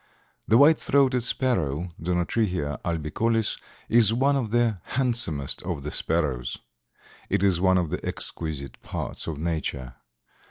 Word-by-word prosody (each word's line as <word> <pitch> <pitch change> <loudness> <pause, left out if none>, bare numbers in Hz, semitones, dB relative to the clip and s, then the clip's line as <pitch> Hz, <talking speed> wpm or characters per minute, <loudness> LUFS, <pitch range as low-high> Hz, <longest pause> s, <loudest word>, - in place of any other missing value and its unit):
The 110 - +5
White 150 +4 +6
throated 135 -3 +2
Sparrow 90 - 0
(Zonotrichia 90 -3 -1
albicollis) 100 +8 0 0.3
is 115 -2 +5
one 135 +5 +2
of 125 -6 -1
the 115 -3 +1
handsomest 115 - -1
of 70 - -4
the 75 - -4
sparrows. 70 -7 -1 0.7
It - - +1
is 95 -3 +3
one 95 0 +4
of 85 -4 -1
the - - -3
exquisite 75 -5 -3
parts - - -4
of 80 -3 -3
nature. 75 -6 -3
90 Hz, 130 wpm, -25 LUFS, 75-115 Hz, 0.7 s, White